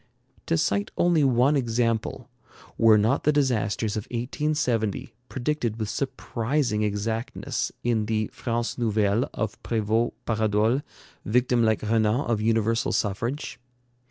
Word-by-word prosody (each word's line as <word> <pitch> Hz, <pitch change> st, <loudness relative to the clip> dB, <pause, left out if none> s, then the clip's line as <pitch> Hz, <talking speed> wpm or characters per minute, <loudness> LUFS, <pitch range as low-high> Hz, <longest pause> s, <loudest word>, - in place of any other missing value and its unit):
To 80 Hz, -, +2 dB
cite 100 Hz, +4 st, 0 dB
only 175 Hz, -3 st, +3 dB
one 130 Hz, +2 st, +3 dB
example, 115 Hz, -3 st, -1 dB, 0.5 s
were 110 Hz, -1 st, +6 dB
not 110 Hz, +7 st, +2 dB
the 150 Hz, -, +4 dB
disasters 115 Hz, -6 st, 0 dB
of 105 Hz, -, -3 dB
1870 125 Hz, -3 st, -1 dB, 0.2 s
predicted 120 Hz, -4 st, -2 dB
with 110 Hz, -2 st, -2 dB
surprising 125 Hz, -3 st, -1 dB
exactness 105 Hz, +3 st, -2 dB
in 115 Hz, -3 st, +1 dB
the 110 Hz, -1 st, -1 dB
'France 120 Hz, 0 st, -3 dB
nouvelle' 110 Hz, 0 st, +1 dB
of 105 Hz, -1 st, -4 dB
Prévost 115 Hz, +1 st, 0 dB
Paradol, 110 Hz, +3 st, +1 dB, 0.4 s
victim 125 Hz, +2 st, +2 dB
like 110 Hz, -2 st, +2 dB
Renan 110 Hz, +3 st, +2 dB
of 115 Hz, -6 st, -1 dB
universal 115 Hz, +1 st, +1 dB
suffrage? 115 Hz, +7 st, -2 dB
115 Hz, 120 wpm, -25 LUFS, 110-125 Hz, 0.5 s, were